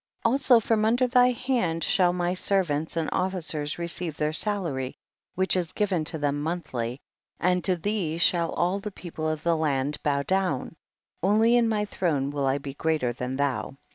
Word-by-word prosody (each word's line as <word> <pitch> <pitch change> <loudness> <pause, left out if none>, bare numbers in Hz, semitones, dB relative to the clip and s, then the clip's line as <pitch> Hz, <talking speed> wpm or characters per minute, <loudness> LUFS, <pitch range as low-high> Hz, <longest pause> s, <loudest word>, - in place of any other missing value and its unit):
22. 230 - +3
Also 260 -3 +5
from 220 0 +1
under 240 +4 +3
thy 250 0 +5
hand 235 -10 -1
shall 180 -2 +3
my 175 0 -1
servants 170 -5 +1
and 160 -2 0
officers 165 -5 -2
receive 170 -2 -3
their 150 +1 0
salary 160 -10 -1 0.4
which 190 +1 +2
is 175 -3 -1
given 190 -6 0
to 160 +1 -3
them 145 -1 -1
month 170 +1 -4
ly, 120 0 -2 0.4
and 180 -1 +1
to 185 - +3
thee 180 -3 -2
sliall 170 -1 +3
all 180 +3 +1
the 210 +1 -5
people 165 -5 -5
of 155 -1 -3
the 170 -1 +2
land 145 -2 -1
bow 140 -1 0
down; 185 -5 -1 0.5
only 220 +5 +4
in 235 -2 +3
my 210 -1 0
throne 150 -9 -1
will 140 -2 -1
I 135 +1 +2
be 140 -1 -7
greater 150 -5 0
than 125 +2 -4
thou. 140 -1 -2
170 Hz, 185 wpm, -26 LUFS, 145-195 Hz, 0.5 s, Also